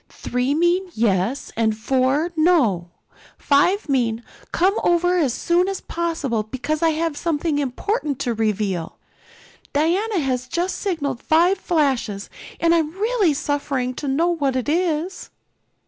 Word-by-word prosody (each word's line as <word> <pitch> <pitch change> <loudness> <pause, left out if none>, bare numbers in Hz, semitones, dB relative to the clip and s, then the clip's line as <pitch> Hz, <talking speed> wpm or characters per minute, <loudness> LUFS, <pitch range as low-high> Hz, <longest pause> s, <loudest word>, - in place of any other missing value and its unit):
Three 250 +3 -2
mean 350 +3 +2
'yes' 215 +3 0
and 220 -1 +1
four 265 +7 +1
'no.' 270 - +2 0.5
Five 350 +9 +2
mean, 240 -4 0 0.3
'Come 375 +3 +2
over 355 +1 +3
as 285 -7 +2
soon 345 +8 +1
as 390 -1 -2
possible, 325 -9 -2
because 260 +8 -3
I 330 - +4
have 320 0 -1
something 310 -1 -1
important 290 - -2
to 240 - 0
reveal.' 210 -6 -2 0.8
Diana 370 +8 +1
has 255 -5 -1
just 350 +7 -2
signaled 285 - -2
five 350 +5 +3
flashes, 265 - -1 0.3
and 335 0 +3
I'm 325 -3 +2
really 410 -5 +1
suffering 280 -3 -1
to 290 - -4
know 310 +6 +2
what 285 -6 0
it 255 +1 -1
is." 335 +2 -1
295 Hz, 135 wpm, -22 LUFS, 250-345 Hz, 0.8 s, I